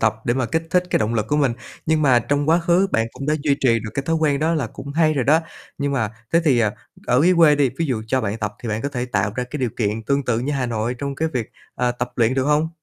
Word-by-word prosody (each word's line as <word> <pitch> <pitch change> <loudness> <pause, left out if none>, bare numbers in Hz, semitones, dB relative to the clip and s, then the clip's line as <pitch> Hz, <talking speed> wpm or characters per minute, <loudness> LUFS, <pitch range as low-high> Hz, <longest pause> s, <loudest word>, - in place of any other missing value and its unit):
tập, 110 -1 +2
để 120 - +1
mà 130 -3 0
kích 165 +4 -1
thích 180 0 +3
cái - - +3
động 110 +2 -1
lực 110 -1 -1
của 150 - +1
mình, 140 -5 +2 0.3
nhưng 160 -1 +2
mà 130 -4 +5
trong 145 +4 -1
quá 165 - +5
khứ 175 +2 +3
bạn 115 0 +1
cũng 135 - -7
đã 150 - +2
duy 140 -2 +2
trì 120 -4 +4
được 110 - -6
cái 135 - -1
thói 165 0 +1
quen 150 -3 +1
đó 160 +2 +1
là 140 -7 -1
cũng 140 +6 -9
hay 155 -1 +3
rồi 130 -4 0
đó. 155 +4 +4 0.4
Nhưng 140 0 -1
mà 110 -6 0 0.2
thế 170 - +5
thì, 135 -6 +4
ờ, 110 -3 +2 0.4
ở 125 +2 +3
dưới 180 0 +5
quê 160 -3 +6
đi, 140 -4 +2
ví 165 - 0
dụ 120 -6 -2
cho 130 +3 +1
bạn 110 0 -3
tập 105 -1 -3
thì 115 - -4
bạn 110 +1 -2
có 140 - -1
thể 125 -3 -3
tạo 105 -4 -1
ra 125 - -1
cái 150 - -4
điều 125 -3 0
kiện 110 0 -1
tương 140 -1 +1
tự 115 -3 0
như 140 +5 -2
Hà 130 -3 -1
Nội 115 +1 -2
trong 140 -1 -3
cái 160 +3 -1
việc, 125 -7 -4 0.3
à, 125 0 +1
tập 120 0 -4
luyện 120 +1 +2
được 135 -1 +1
hông? 150 +2 +2
135 Hz, 310 wpm, -21 LUFS, 115-150 Hz, 0.4 s, quê